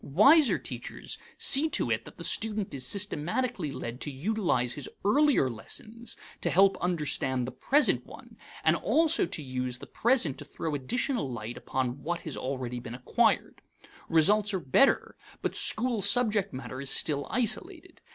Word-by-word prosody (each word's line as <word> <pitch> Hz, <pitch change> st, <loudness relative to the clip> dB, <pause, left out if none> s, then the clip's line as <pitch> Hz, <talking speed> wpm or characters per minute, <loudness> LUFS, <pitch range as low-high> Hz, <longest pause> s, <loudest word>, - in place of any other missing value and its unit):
Wiser 270 Hz, -, +5 dB
teachers -, -, -7 dB, 0.2 s
see 295 Hz, +4 st, +6 dB
to -, -, 0 dB
it -, -, -1 dB
that -, -, -13 dB
the -, -, -8 dB
student 215 Hz, -3 st, -1 dB
is 135 Hz, -2 st, -4 dB
systematically 195 Hz, -, -1 dB
led 125 Hz, -2 st, -6 dB
to -, -, -1 dB
utilize 145 Hz, -, 0 dB
his 145 Hz, -, -5 dB, 0.2 s
earlier 280 Hz, -, +3 dB
lessons 215 Hz, -, -5 dB, 0.2 s
to -, -, 0 dB
help 195 Hz, +2 st, +4 dB
understand 150 Hz, -7 st, -1 dB
the 130 Hz, -, -5 dB
present 275 Hz, -, +2 dB
one, -, -, -14 dB, 0.3 s
and -, -, +4 dB
also 325 Hz, -, +2 dB
to 165 Hz, -4 st, -4 dB
use 130 Hz, -1 st, -4 dB
the -, -, -10 dB
present 230 Hz, -, +1 dB
to 145 Hz, -, -8 dB
throw 155 Hz, +2 st, -5 dB
additional 145 Hz, -, -2 dB
light 120 Hz, 0 st, -6 dB
upon 130 Hz, +1 st, -3 dB
what 175 Hz, +3 st, -3 dB
has 155 Hz, -, -5 dB
already 130 Hz, -2 st, -4 dB
been 120 Hz, 0 st, -8 dB
acquired. 125 Hz, -, 0 dB, 0.5 s
Results 200 Hz, +6 st, +3 dB
are -, -, -1 dB
better, 170 Hz, -, +2 dB, 0.3 s
but -, -, -2 dB
school 235 Hz, -1 st, +2 dB
subject 205 Hz, -1 st, +3 dB
matter 130 Hz, 0 st, -7 dB
is 140 Hz, -, -1 dB
still 145 Hz, -1 st, 0 dB
isolated. 240 Hz, -1 st, -2 dB
165 Hz, 160 wpm, -28 LUFS, -, 0.5 s, see